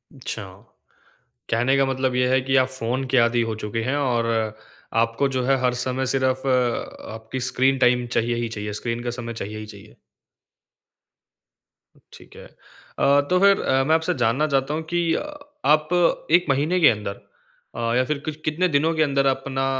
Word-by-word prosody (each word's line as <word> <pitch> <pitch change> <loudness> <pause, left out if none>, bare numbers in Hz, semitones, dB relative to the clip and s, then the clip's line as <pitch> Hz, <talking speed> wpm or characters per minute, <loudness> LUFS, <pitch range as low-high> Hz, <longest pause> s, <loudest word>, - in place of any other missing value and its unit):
अच्छा। 115 -4 -6 1.1
कहने 120 +4 +2
का 135 - +3
मतलब 130 -1 -1
ये 125 0 +2
है 130 0 +3
कि 135 +1 -1
आप 130 0 +4
फ़ोन 130 0 -3
के 130 - +2
आदि 120 0 +3
हो 110 - -3
चुके 110 +2 -3
हैं 130 +4 -1
और 125 -5 0 0.8
आपको 115 +4 0
जो 125 - 0
है 135 0 +3
हर 125 -1 +2
समय 130 +1 -1
सिर्फ 130 0 0
अ, 125 -4 -1
आपकी 110 +3 -6
स्क्रीन 130 +2 +2
टाइम 125 -1 +3
चाहिए 120 +1 +1
ही 120 -1 -2
चाहिए। 105 -1 -5
स्क्रीन 120 0 -3
का 120 - -2
समय 115 0 -6
चाहिए 105 -1 -6
ही 105 - -7
चाहिए। 105 0 -14 2.2
ठीक - - -15
है। - - -12
अ, 140 +1 -1
तो 180 0 +3
फिर 200 0 +4
अ, 135 0 +2
मैं 160 +3 +3
आपसे 160 0 0
जानना 130 +7 +2
चाहता 140 0 0
हूँ 160 +1 -3
कि 170 -1 +1
अ, - - -1 0.4
आप 155 +1 +3 0.4
1 175 +1 +5
महीने 150 +7 +1
के 160 - +7
अंदर 105 -2 -3 0.5
अ, 115 0 -1
या 125 - +3
फिर 150 +1 -1
कि 155 - -2
कितने 165 +4 +1
दिनों 160 +3 +2
के 155 - +3
अंदर 140 -2 +1
अपना 135 0 -1
130 Hz, 185 wpm, -23 LUFS, 115-140 Hz, 2.2 s, के